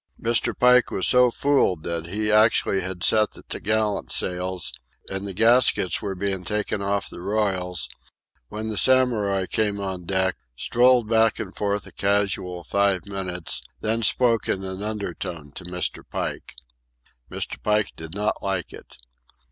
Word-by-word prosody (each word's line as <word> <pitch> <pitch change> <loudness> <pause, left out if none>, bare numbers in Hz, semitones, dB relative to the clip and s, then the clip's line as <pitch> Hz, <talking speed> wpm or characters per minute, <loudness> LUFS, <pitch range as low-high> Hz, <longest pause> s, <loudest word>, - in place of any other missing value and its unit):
Mr. 115 +1 0
Pike 125 0 +5
was 95 - +1
so 125 0 +6
fooled 120 - +1
that 85 0 -3
he 105 +4 -1
actually 105 -2 +3
had 95 0 -5
set 110 -1 +3
the - - -11
topgallant 110 0 -1
sails, 90 0 -1 0.4
and 95 +1 -2
the 95 - -4
gaskets 115 -5 +3
were 100 -2 -4
being 95 -1 -2
taken 105 +2 -2
off 100 0 -1
the - - -8
royals, 95 -5 -1 0.6
when 110 - -5
the 110 - -3
Samurai 110 -7 +3
came 105 0 -1
on 95 -3 -5
deck, 95 -1 +1 0.2
strolled 125 - +3
back 115 0 +3
and - - -6
forth 100 0 -1
a - - -12
casual 100 -3 0
five 100 +3 +1
minutes, 95 -4 -4 0.2
then 110 +1 -1
spoke 115 -1 +3
in 95 - -1
an 95 0 -5
undertone 90 -8 -5
to - - -9
Mr. 90 0 -2
Pike. - - -5 0.7
Mr. - - -4
Pike 105 -1 +1
did 80 +1 -8
not 105 +1 -1
like 95 -4 -3
it. - - -12
100 Hz, 155 wpm, -24 LUFS, 95-110 Hz, 0.7 s, so